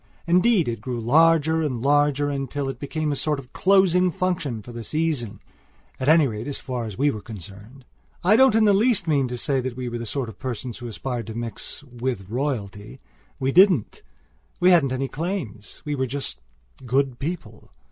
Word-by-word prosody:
Indeed, 180 - +3
it 115 -2 -3
grew 125 0 -4
larger 160 +5 +4
and 135 -6 -1
larger, 145 +2 +2
until 140 0 -3
it 135 - -6
became 155 +1 -2
a - - 0
sort 150 +1 0
of 130 -2 -11
closing 185 -2 +4
function 165 - -2
for 120 - -10
the 115 -1 -7
season, 145 -9 -2 0.6
at 130 - +1
any 160 -1 +6
rate 110 +1 -5
as 145 - -4
far 125 -3 -4
as 105 -4 -7
we 145 +2 +3
were 110 - -6
concerned. 105 +6 -11 0.4
I 195 +5 +5
don't 260 -1 +5
in 225 - +5
the 205 - +5
least 210 -3 +2
mean 140 -4 +2
to 125 0 -5
say 135 +1 0
that 125 -1 -5
we 125 -1 -3
were 120 0 -4
the 115 - -5
sort 135 +1 -2
of 110 - -11
persons 125 -1 -5
who 120 - -6
aspired 120 0 -4
to 110 - -6
mix 115 +3 -5
"with 120 -6 -5
royalty." 115 -4 -3 0.4
We 135 0 0
didn't; 180 - +4 0.6
we 180 +1 +5
hadn't 155 -7 +4
any 130 +1 -1
claims; 140 - -5
we 150 - -2
were 130 -2 -1
just 125 - -5 0.4
"good 130 0 0
people." 135 -9 -6
135 Hz, 195 wpm, -24 LUFS, 120-160 Hz, 0.6 s, any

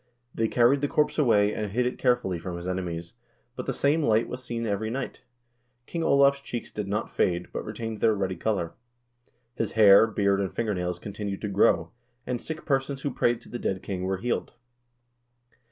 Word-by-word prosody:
They 115 - +1
carried 125 +4 +3
the 145 - +1
corpse 150 +2 +1
away, 105 -7 +4
and 105 -1 -3
hid 125 +4 +1
it 125 - -2
care 125 -2 +4
fully 95 -8 -4
from 85 +1 -5
his 85 +1 -6
enemies, 85 -2 -4 0.4
but - - -6
the - - +1
same 145 +3 +2
light 115 -5 +2
was 125 0 -6
seen 120 -2 -3
every 110 +1 -1
night. 125 +3 -4 0.6
King 170 - -4
Olav's 140 -2 +4
cheeks 120 -3 -6
did 105 -2 -4
not 105 +3 -2
fade, 90 -1 0
but - - -3
retained 110 0 -5
their 110 - +4
ruddy 95 -2 -1
color. 90 -3 -1 0.8
His - - -3
hair, 105 0 +7
beard, 100 -2 +1
and 95 - -2
fingernails 90 -6 -2
continued 100 +1 -5
to 105 - -2
grow, 85 -4 +3 0.3
and 125 -1 -3
sick 160 0 -6
persons 135 -1 -1
who 140 - -2
prayed 120 -1 +1
to - - -13
the 120 - -5
dead 95 -1 -2
king 95 -2 -4
were 95 +1 -1
healed. 120 +5 -2
110 Hz, 195 wpm, -27 LUFS, 95-125 Hz, 0.8 s, hair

